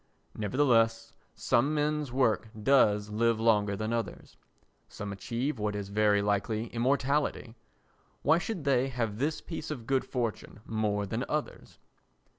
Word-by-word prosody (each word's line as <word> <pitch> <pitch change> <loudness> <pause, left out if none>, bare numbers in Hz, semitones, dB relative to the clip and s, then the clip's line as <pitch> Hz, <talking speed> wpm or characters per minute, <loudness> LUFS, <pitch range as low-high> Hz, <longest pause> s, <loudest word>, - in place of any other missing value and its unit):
Nevertheless, 115 -1 +1 0.2
some 140 +6 +1
men's 150 -2 0
work 115 -3 +1
does 105 -5 +4
live 115 +1 +2
longer 105 -3 +2
than 110 +2 -2
others. 115 -1 -4 0.5
Some 100 0 -6
achieve 120 +7 -3
what 105 0 -1
is 100 -1 -4
very 105 0 +3
like 100 +1 0
immortality. 125 +3 0 0.7
Why 160 +4 +4
should 185 -3 -4
they 135 -2 +2
have 115 -5 -3
this 150 +3 -1
piece 160 -2 -6
of 130 -7 -5
good 135 +1 +1
fortune 115 -3 -4
more 105 -2 -1
than 110 +5 -3
others? 150 -1 -4
115 Hz, 135 wpm, -29 LUFS, 105-135 Hz, 0.7 s, does